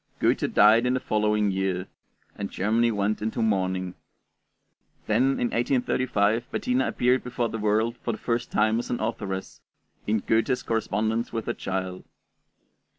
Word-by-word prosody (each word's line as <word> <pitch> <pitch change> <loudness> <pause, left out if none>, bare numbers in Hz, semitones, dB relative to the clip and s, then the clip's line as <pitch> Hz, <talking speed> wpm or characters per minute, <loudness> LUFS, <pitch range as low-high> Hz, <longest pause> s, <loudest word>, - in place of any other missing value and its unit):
Goethe - - +1
died 115 +4 +5
in 125 - +2
the - - 0
following 105 -2 +1
year, 95 -1 -1 0.5
and 100 -1 -4
Germany 115 +4 +1
went 105 0 -1
into 110 +3 -2
mourning. 95 -4 0 1.1
Then 125 +5 +2
in 120 - -1
1835 120 -3 +1
Bettina 250 +1 0
appeared 125 +1 +1
before 125 -1 -2
the 115 - -4
world 110 +3 +1
for 120 - -3
the 110 - -5
first 120 +1 -2
time 110 +1 +2
as 120 - -5
an 120 - -1
authoress, 100 -4 -4 0.5
in 105 0 +1
'Goethe's 115 +5 +1
Correspondence 110 +1 -1
with 115 -2 -4
a - - 0
Child.' 95 -1 -4
110 Hz, 150 wpm, -26 LUFS, 100-120 Hz, 1.1 s, died